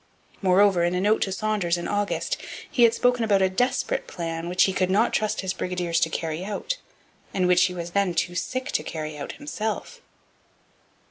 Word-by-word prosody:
Moreover, 190 -1 +4
in 175 +1 +1
a - - +1
note 210 +3 +2
to 195 - 0
Saunders 195 -3 0
in 175 - -4
August, 205 0 -1 0.3
he 245 - 0
had 230 -1 +6
spoken 245 -1 +2
about 200 -3 +3
a 190 - +2
'desperate' 265 - 0
plan 165 -1 -4
which 180 +1 +4
he 190 - +2
could 185 -1 +1
not 210 +5 +3
trust 215 -1 0
his 190 -1 -2
brigadiers 180 -3 -1
to 160 - +2
carry 160 +1 -3
out, 215 - -3 0.6
and 185 -2 +2
which 180 0 +5
he 185 - -2
was 170 -1 -5
then 195 -2 +1
too 175 +2 0
sick 255 +9 -3
to - - +1
carry 155 -1 -5
out 145 - -6
himself. 290 - -4
190 Hz, 195 wpm, -25 LUFS, 175-215 Hz, 0.6 s, had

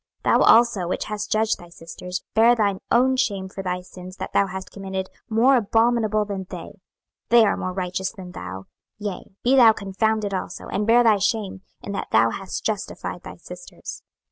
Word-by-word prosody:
26:016:052 - - +4
Thou - - +3
also, 225 -6 +2
which 180 - -2
hast 210 -1 -5
judged 220 0 +1
thy 175 - -13
sisters, 175 +2 -7
bear 230 +2 +5
thine 200 -4 +1
own 260 +2 +4
shame 200 -7 -1
for 195 +1 -7
thy 180 -1 -3
sins 180 0 -11
that - - -6
thou 200 - +3
hast 190 0 -7
committed 190 -1 -5 0.2
more 235 +5 +4
abominable 225 -1 +2
than 195 -2 -5
they: 180 +3 -9 0.5
they 235 -1 +7
are - - +2
more 185 - -3
righteous 185 0 -3
than 185 -2 -10
thou: 95 - -7 0.3
yea, 205 -3 -5 0.2
be 255 +3 +4
thou 240 -4 +8
confounded 210 0 -1
also, 185 -1 -5
and 210 +1 -1
bear 240 +2 +6
thy 220 -3 +5
shame, 195 -1 -1 0.2
in 200 - -5
that 200 - -4
thou 115 +1 +4
hast 190 +6 -6
justified 210 -2 -3
thy - - -9
sisters. - - -10
200 Hz, 190 wpm, -23 LUFS, 185-225 Hz, 0.5 s, thou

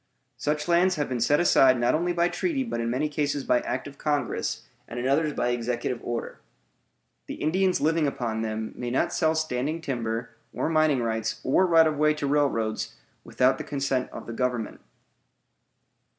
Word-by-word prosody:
Such 150 +4 -1
lands 175 +2 +3
have 145 - -1
been 125 -2 -3
set 145 +6 +3
aside 130 -7 +5
not 120 - +2
only 175 +3 +1
by 170 0 +2
treaty 285 - -1
but 230 - -4
in 115 - -1
many 130 +6 0
cases 145 -1 -1
by 125 - +3
act 125 +2 -3
of 140 - -12
Congress, 145 -5 -1 0.2
and 120 - -6
in 125 - -1
others 150 +3 +2
by 125 - 0
executive 120 0 -2
order. 120 -1 -4 0.9
The - - -5
Indians 185 +4 +1
living 160 0 +2
upon 115 -5 -2
them 110 0 -3
may 120 - -4
not 125 - 0
sell 160 -1 +2
standing 155 0 -1
timber, 120 -6 -3 0.2
or - - -1
mining 155 -5 +2
rights, 110 -1 -2
or 185 +8 +3
right 165 -2 +6
of 155 -2 0
way 150 0 +3
to 150 - -3
railroads, 140 -6 0 0.3
without 130 +1 +2
the - - -3
consent 135 -2 -1
of - - -9
the 115 - -6
Government. 120 -2 -2
140 Hz, 180 wpm, -26 LUFS, 120-155 Hz, 0.9 s, right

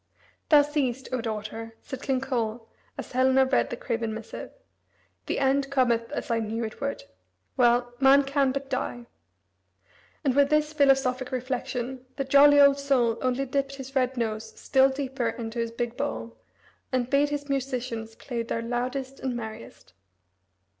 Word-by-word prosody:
"Thou 295 -2 +7
seest, 275 -3 -2
O 255 -2 -1
daughter," 225 +1 -5
said 265 -2 -7
King 265 -2 0
Coel 230 -4 -2 0.3
as - - -7
Helena 260 +1 +4
read 260 0 +1
the 240 - -5
craven 225 -2 -2
missive, 225 0 -7 0.8
"the - - -1
end 275 0 +2
cometh 240 -3 +1
as 290 - -4
I 230 - +2
knew 225 +1 -3
it 220 +3 -6
would. 280 - -3 0.5
Well, 245 -1 +3
man 275 +1 +6
can 275 -1 +1
but 275 +1 -4
die." 245 -2 -3 1.2
And 270 -4 +2
with 280 0 +4
this 305 0 +2
philosophic 270 -3 +2
reflection 255 0 -3
the 275 - -1
"jolly 285 +2 +6
old 280 0 +6
soul" 250 -5 +2
only 255 +1 0
dipped 275 +1 -2
his 270 0 -9
red 260 -1 +1
nose 220 -1 -3
still 265 0 +4
deeper 265 -2 -2
into 230 0 -5
his 230 0 -1
big 235 +1 -4
bowl, 115 0 -4 0.6
and 255 -2 0
bade 280 +2 +3
his 290 -1 -4
musicians 250 -5 -3
play 240 -1 -4
their 230 0 -3
loudest 255 +3 -3
and 260 -2 -2
merriest. 220 - -8
255 Hz, 160 wpm, -27 LUFS, 235-275 Hz, 1.2 s, Thou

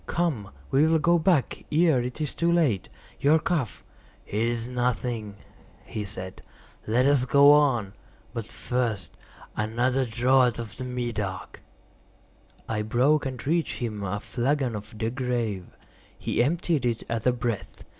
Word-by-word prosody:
Come, 150 - -1 0.2
we 145 +4 +4
will 160 0 +4
go 170 +2 +3
back 160 -4 +1
ere 155 -4 +4
it 125 +4 -5
is 150 -2 -2
too 170 0 +1
late. 150 - +2 0.3
Your 145 +3 +5
cough—" 155 - -2 0.4
"It 110 +3 0
is 120 0 -1
nothing," 120 -4 -2 0.5
he 105 -1 -4
said; 95 -2 -6 0.5
"let 120 +4 +3
us 140 -2 +4
go 140 +2 +7
on. 125 -9 +3 0.4
But 115 -3 -4
first, 120 -6 -2 0.4
another 120 +5 +1
draught 125 +1 +3
of 115 -3 -6
the 130 - -4
Medoc." 120 -7 -4 1.1
I 110 -1 -1
broke 130 +7 +2
and 130 -1 -6
reached 165 +3 0
him 110 -4 -4
a 100 +1 -2
flagon 130 +1 -1
of 105 +1 -8
De 110 +1 -1
Grâve. 120 -7 -2 0.5
He - - 0
emptied 160 +1 +1
it 120 -2 -1
at 115 +1 -2
a - - +6
breath. 115 -6 -4
125 Hz, 145 wpm, -26 LUFS, 110-140 Hz, 1.1 s, go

